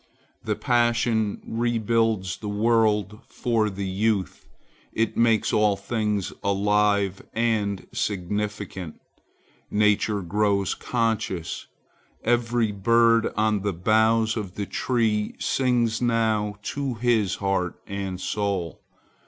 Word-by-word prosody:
The - - -1
passion 120 -3 +1
rebuilds 115 -4 0
the 105 - -6
world 105 -1 +1
for 115 -3 0
the 100 0 -5
youth. 95 -2 -1 0.5
It 115 0 0
makes 115 -2 +2
all 105 -1 +3
things 105 -1 -2
alive 100 -1 +1
and 110 -4 0
significant. 100 -2 -3 0.7
Nature 105 -1 +2
grows 100 +1 +1
conscious. 110 -8 -2 0.6
Every 120 -1 +1
bird 115 +3 +3
on 105 -1 +2
the 100 0 -1
boughs 110 +4 +2
of 100 -4 -5
the 100 - -3
tree 110 -2 0
sings 120 -4 +1
now 110 -3 +1
to 140 -1 -3
his 115 -4 +1
heart 95 -3 -1
and 95 -2 -4
soul. 95 -4 -2
105 Hz, 105 wpm, -25 LUFS, 100-115 Hz, 0.7 s, all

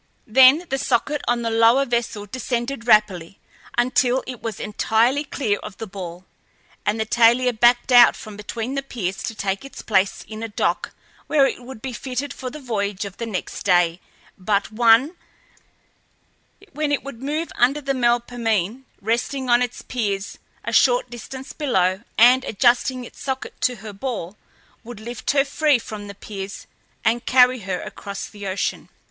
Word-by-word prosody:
Then 265 +8 +6
the 270 - 0
socket 290 +5 0
on 240 0 +1
the 230 - -1
lower 230 +4 +4
vessel 235 -4 -2
descended 240 +2 -3
rapidly 195 -5 +3 0.4
until 250 +1 +2
it 250 -3 -7
was 225 -3 -5
entirely 225 +6 +1
clear 235 -8 -1
of 210 -2 -9
the 225 - -5
ball, 185 -3 -8 0.6
and 215 +2 +1
the 220 - 0
Thalia 240 +2 +4
backed 240 +3 +3
out 245 -1 +8
from 215 -2 -10
between 225 +4 -5
the 275 - -1
piers 195 -8 -4
to 225 - -4
take 195 +1 -2
its 275 - -10
place 195 -3 +1
in 215 0 -8
a 225 - -3
dock 210 - -1 0.3
where 285 -3 +4
it 260 - -2
would 245 -2 -11
be 265 -2 -4
fitted 265 +3 -4
for 255 - -6
the 300 - -9
voyage 205 -6 -2
of 195 -1 -9
the 230 - -4
next 190 -5 -5
day 175 -2 +2 0.4
but 200 +2 0
one, 235 +8 +4 1.6
when 300 +1 -2
it 285 - 0
would 275 -4 -9
move 305 +4 -3
under 265 +5 +3
the 275 -1 -2
Melpomene, 240 -2 0 0.2
resting 245 +4 -1
on 240 0 +5
its 245 -1 -3
piers 205 -5 -3 0.2
a - - -4
short - - +3
distance 260 +2 -8
below, 190 - +1 0.2
and, 250 +3 +6
adjusting 250 +3 +2
its - - -14
socket 265 -1 -4
to 250 - +1
her 215 -1 -9
ball, 205 -4 -5 0.5
would 235 -2 -9
lift 235 +2 -6
her 275 -1 +3
free 290 0 +2
from 215 -3 -8
the 200 - -9
piers 195 0 -7 0.4
and 235 +2 +1
carry 255 0 +5
her 190 -3 -3
across 200 -1 -7
the 205 -2 -8
ocean. 190 +1 -3
235 Hz, 170 wpm, -22 LUFS, 205-260 Hz, 1.6 s, out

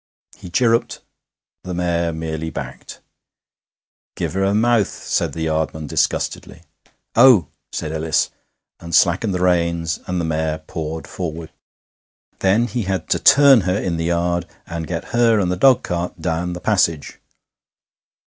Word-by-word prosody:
He 90 - -11
chirruped. 115 +4 +1 0.6
The 90 -1 -5
mare 85 -1 0
merely 80 0 -4
backed. - - -8 1.1
'Give - - -3
'er 95 0 +1
'er 100 +1 +1
mouth,' 115 -2 +3
said - - -2
the 80 - -4
yardman 80 0 -2
disgustedly. - - -2 0.5
'Oh!' 110 - +6 0.2
said 75 - -4
Ellis, 80 -1 0 0.5
and 85 -1 -3
slackened 95 +3 +3
the 90 - -1
reins, 85 -2 +1
and 90 0 -2
the 85 - -1
mare 80 -1 -1
pawed 80 0 -6
forward. 80 -2 -6 0.9
Then 100 +5 +3
he 120 +1 -3
had 95 0 -3
to - - +2
turn 140 -4 +7
her 90 +1 0
in 90 -5 -2
the 80 - -2
yard, 85 0 0 0.2
and 85 -1 -5
get 85 -2 -5
her 115 -2 +4
and 90 -3 0
the - - 0
dogcart 90 -7 +1
down 85 +1 -2
the 90 - -6
passage. 85 -8 0
85 Hz, 145 wpm, -20 LUFS, 80-95 Hz, 1.1 s, turn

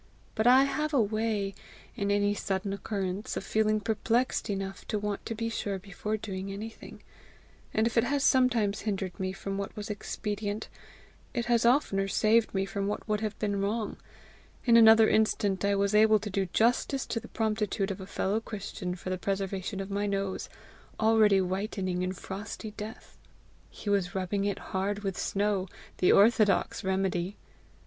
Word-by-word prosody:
But 220 +2 +1
I 260 +2 +8
have 300 +2 -1
a - - +5
way, 215 -2 0 0.4
in 200 0 -1
any 205 0 +2
sudden 195 -1 -2
occurrence, 200 -1 -3
of - - -3
feeling 215 0 +1
perplexed 225 +4 0
enough 195 -1 -4
to 215 - -1
want 205 -1 -3
to 225 - -3
be 230 +1 -2
sure 205 -3 -2
before 200 +3 -4
doing 195 -2 -5
anything, 220 +3 -8 0.7
and 220 - +2
if 230 - -1
it 230 - +4
has 280 +1 0
sometimes 240 -7 +3
hindered 195 -4 -3
me 185 0 -1
from 195 +1 -4
what 200 - -5
was 210 +1 -4
expedient, 205 0 -4 0.7
it 240 -1 0
has 235 -1 +3
oftener 200 -7 +2
saved 220 +3 +3
me 195 -1 0
from 200 0 -3
what 210 - -3
would 210 -1 0
have 215 -1 -3
been 205 -2 -1
wrong: 215 +2 -1 0.7
in 235 -2 +5
another 225 -1 +8
instant 205 -3 +2
I 200 0 +2
was 200 +1 +1
able 215 +1 +6
to 210 0 -6
do 195 0 0
justice 245 +7 +1
to 230 - -2
the 230 - -11
promptitude 215 -2 -1
of 195 - -6
a 190 - -8
fellow 200 +2 0
Christian 200 -4 -5
for 185 +1 -6
the 185 - -2
preservation 195 0 -2
of 195 0 -5
my 205 +1 0
nose, 195 -1 -2 0.5
already 220 -3 +5
whitening 185 -1 -2
in 185 0 -1
frosty 205 +3 -7
death: 215 +2 -9 0.5
he - - -12
was 195 -3 +1
rubbing 195 +2 -1
it 200 -1 -1 0.2
hard 200 +2 -1
with 195 -2 -2
snow, 200 0 0 0.3
the 180 - +5
orthodox 205 -2 +4
remedy! 190 0 -1
205 Hz, 170 wpm, -29 LUFS, 195-220 Hz, 0.7 s, I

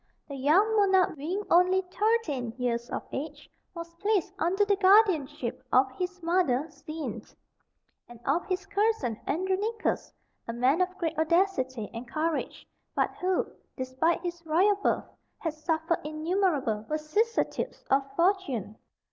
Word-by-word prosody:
The 280 - -7
young 345 +12 +3
monarch 380 -4 +4
being 345 +8 -3
only 365 +2 +5
thirteen 360 - 0
years 240 -2 -1
of - - -3
age, 295 +1 -6 0.3
was 335 0 -7
placed 405 -1 0
under 380 +5 +2
the 405 0 +3
guardianship 330 - +3
of 260 +1 +4
his 360 +5 -5
mother 330 -7 +2
Xene, 310 0 -6 0.9
and 240 -1 -12
of 315 +6 +1
his 375 0 -2
cousin 400 - 0
Andronicus, 385 +7 -1 0.4
a 230 - -3
man 255 +8 +2
of 365 0 -1
great 330 -2 -2
audacity 315 - +1
and 235 +2 -7
courage, 315 +2 -2 0.3
but - - +1
who, 370 0 +1 0.3
despite 260 +6 0
his 345 -1 -5
royal 345 +6 +4
birth, 405 - 0 0.3
had 325 -3 -3
suffered 320 +1 -1
innumerable 310 - 0
vicissitudes 310 +10 -1
of 270 +1 +5
fortune. 335 - 0
335 Hz, 130 wpm, -28 LUFS, 275-380 Hz, 0.9 s, only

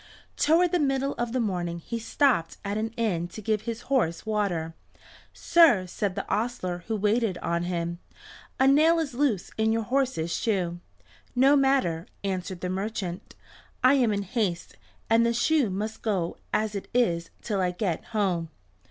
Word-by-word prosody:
Toward 335 +3 +3
the 355 - +2
middle 275 -1 +1
of 240 -1 -1
the 255 - 0
morning 175 -6 -2
he 230 +7 -5
stopped 230 - +1
at 200 +1 -2
an 220 +1 -1
inn 185 -7 0
to 175 - -10
give 215 0 0
his 230 0 -4
horse 220 -12 0
water. 195 -7 -1 0.6
"Sir," 295 - +4
said 185 +1 -3
the 200 - -4
ostler 200 -5 -2
who 225 - -1
waited 210 -1 +1
on 170 0 -1
him, 170 -1 -3 0.6
"a 265 - +5
nail 310 +5 +5
is 310 -5 -2
loose 240 -8 0
in 220 0 +3
your 225 0 0
horse's 250 -9 0
shoe." 180 -6 -1 0.6
"No 270 +3 +5
matter," 265 - +2 0.2
answered 185 -2 -3
the 180 - -2
merchant. 190 -2 -4 0.5
"I 255 +2 +7
am 250 -5 +3
in 200 -1 -1
haste, 195 -4 -2 0.3
and 225 +1 +4
the 235 0 +1
shoe 290 -1 +2
must 210 +4 -4
go 190 -6 -1
as 215 0 0
it 200 - -5
is 170 -9 +1
till 205 -4 -1
I 180 - +2
get 180 -1 -2
home." 185 -7 -1
215 Hz, 170 wpm, -27 LUFS, 180-245 Hz, 0.6 s, I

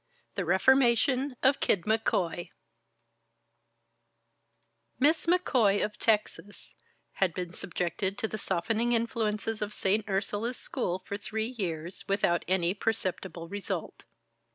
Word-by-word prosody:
IX - - -46
The 190 - 0
Reformation 255 - +3
of 270 +1 +4
Kid 180 - +2
McCoy 190 -6 0 2.5
Miss 310 +5 +2
McCoy, 255 - +3
of 210 0 -8
Texas, 210 -2 -1 0.4
had 185 -4 0
been 180 -1 -4
subjected 180 +3 -2
to 235 -3 -1
the 215 - -5
softening 225 +7 0
influences 225 -2 -1
of 210 0 -3
St. 205 +2 +1
Ursula's 205 +5 -1
School 185 -8 -3
for 200 - -3
three 220 +3 -3
years, 175 -4 -4
without 195 -3 +2
any 180 -1 +2
perceptible 190 -5 -3
result. 200 +3 -4
210 Hz, 115 wpm, -29 LUFS, 185-230 Hz, 2.5 s, of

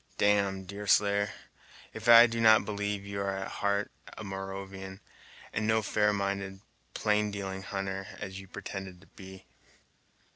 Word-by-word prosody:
"Damme, 100 -2 +2
Deerslayer, 100 +1 +2 0.6
if 110 +2 -3
I 115 0 +11
do 115 -1 -2
not 110 0 +6
believe 100 -1 -3
you 100 0 -4
are 100 0 -1
at 95 - -4
heart 100 0 +1 0.3
a - - -6
Moravian, 95 0 -6 0.5
and 110 +1 -1
no 110 0 +2
fair 105 0 +2
minded, 100 -1 -2 0.3
plain 105 0 +1
dealing 95 -2 -5
hunter, 95 -1 -4
as 95 0 -6
you've 95 -1 -13
pretended 95 -2 -7
to 100 - -19
be!" 95 -1 -11
100 Hz, 145 wpm, -30 LUFS, 95-105 Hz, 0.6 s, I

